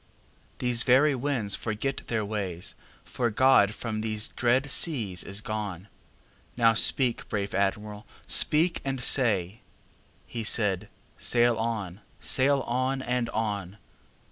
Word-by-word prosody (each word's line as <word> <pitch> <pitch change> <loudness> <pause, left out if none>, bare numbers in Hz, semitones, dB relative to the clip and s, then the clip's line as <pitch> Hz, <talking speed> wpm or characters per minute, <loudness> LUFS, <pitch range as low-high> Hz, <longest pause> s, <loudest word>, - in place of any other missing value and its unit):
These 125 -1 +1
very 135 +5 +5
winds 125 -6 -2
forget 115 +5 -4
their 110 -3 -2
way, 100 -5 -4 0.5
For 120 -1 -2
God 110 -3 +3
from 110 -2 -4
these 110 -1 0
dread 130 +4 0
seas 110 - +1
is 100 +2 -3
gone. 105 -3 -6 0.7
Now 115 -1 +4
speak, 120 +2 +2
brave 100 -1 -3
Admiral, 105 +1 -3 0.2
speak 165 +4 +3
and 135 -1 -3
say"—He 115 0 -2
said: 105 -4 +1 0.3
"Sail 120 0 +2
on! 110 -4 -4 0.2
sail 140 +1 +2
on! 130 +2 -2
and 125 -1 -2
on!" 105 -4 -4
115 Hz, 115 wpm, -26 LUFS, 105-130 Hz, 0.7 s, very